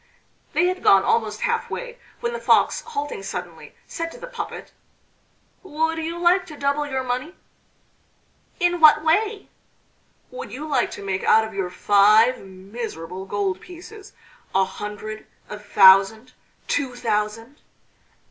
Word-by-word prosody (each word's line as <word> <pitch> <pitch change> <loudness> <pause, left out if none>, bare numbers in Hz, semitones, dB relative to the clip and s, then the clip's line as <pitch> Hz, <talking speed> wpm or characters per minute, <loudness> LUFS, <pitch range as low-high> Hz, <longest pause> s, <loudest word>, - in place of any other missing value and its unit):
They 350 - +2
had 370 +1 -1
gone 195 -1 +5
almost 215 -2 0
half 465 -1 -1
way - - -7 0.2
when 470 0 -2
the 475 - -4
Fox, - - +2
halting 290 - -5
suddenly, 195 - -8
said 330 0 -5
to - - -12
the - - -8
puppet: - - -7 0.9
"Would 320 -2 -2
you 330 +1 -4
like 350 +2 +2
to 300 - -11
double 285 +1 -1
your 265 -2 -2
money?" 255 +8 -4 1.2
"In 350 0 +1
what 305 -1 +7
way?" 410 +6 0 0.8
"Would 475 -2 -8
you 295 +5 -7
like 295 - +1
to 200 - -9
make 190 -1 -2
out 220 - +5
of 220 - -9
your 190 -2 -3
five 210 +6 +4
miserable 190 -2 -8
gold 195 -2 -2
pieces, 375 +4 -13 0.4
a 190 0 +4
hundred, 210 +3 -8 0.2
a 210 - -6
thousand, 200 +3 +5 0.3
two 265 -3 -1
thousand?" 225 +3 -3
255 Hz, 140 wpm, -22 LUFS, 205-335 Hz, 1.2 s, what